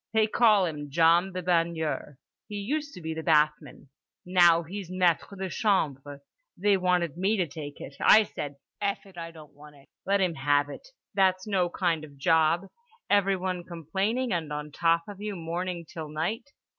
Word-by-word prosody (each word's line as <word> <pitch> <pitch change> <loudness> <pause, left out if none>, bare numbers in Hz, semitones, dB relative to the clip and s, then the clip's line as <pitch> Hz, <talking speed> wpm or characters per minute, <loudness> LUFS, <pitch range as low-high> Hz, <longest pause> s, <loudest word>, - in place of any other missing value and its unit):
They 220 -1 +4
call 215 -3 +4
him 150 -3 -5
John 170 +5 +4
the 185 0 -5
Baigneur. 165 -4 -1 0.3
He 210 - -7
used 290 +9 -3
to 180 - -9
be 160 0 -4
the 160 - -5
bathman. 150 -3 +1 0.4
Now 175 -2 +5
he's 185 +2 -7
Maître 185 +1 +1
de 190 0 -3
Chambre. 145 - -1 0.4
They 205 +1 +3
wanted 180 -4 0
me 200 +4 +1
to 180 - +1
take 145 -1 -8
it—I 215 +9 +4
said, 145 -8 -6 0.3
'F—— 200 +1 -1
it, 195 -2 -17
I 165 0 -6
don't 155 -3 -14
want 150 0 -15
it.' 140 -1 -21 0.2
Let 200 +1 +3
him 185 -3 +1
have 145 0 +1
it. - - -10 0.3
That's 190 -1 +2
no 190 -4 +1
kind 170 -3 -1
of 150 -2 -11
a - - -19
job, 160 +4 +2 0.5
everyone 190 -3 +1
complaining 190 - -2
and 160 -4 -2
on 150 0 -5
top 165 +2 +2
of 205 -1 -9
you 210 -1 -4
morning 170 +1 -4
till 155 -1 -7
night. 170 - -3
175 Hz, 180 wpm, -27 LUFS, 155-195 Hz, 0.5 s, Now